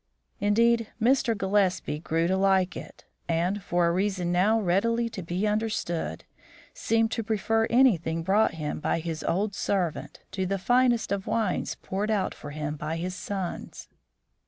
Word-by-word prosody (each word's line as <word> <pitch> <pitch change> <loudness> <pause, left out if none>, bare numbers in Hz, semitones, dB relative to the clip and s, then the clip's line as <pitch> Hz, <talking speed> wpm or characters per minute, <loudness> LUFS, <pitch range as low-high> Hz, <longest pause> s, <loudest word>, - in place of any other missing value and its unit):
Indeed, 230 +2 +3
Mr. 235 -1 +2
Gillespie 190 -5 +1
grew 165 +1 0
to 185 +2 +1
like 190 -1 +2
it, - - -10 0.2
and, 175 +5 0
for 175 -1 +1
a 170 - +3
reason 185 -1 0
now 200 +6 +3
readily 230 +5 +1
to 215 -4 -6
be 175 +4 -2
understood, 210 - -2 0.5
seemed 225 0 +1
to 230 - -1
prefer 225 +1 +1
anything 180 -11 +3
brought 195 0 +2
him 150 -2 -4
by - - 0
his 160 -1 -4
old 200 +5 0
servant 185 -5 -2
to 190 -1 -2
the 195 +1 0
finest 245 +4 +2
of 200 -1 -2
wines 220 -5 -1
poured 200 +3 -2
out 205 -4 0
for 145 - -9
him 150 0 -4
by 155 +2 -3
his 180 +2 -3
sons. 190 -2 -5
195 Hz, 155 wpm, -27 LUFS, 175-220 Hz, 0.5 s, Indeed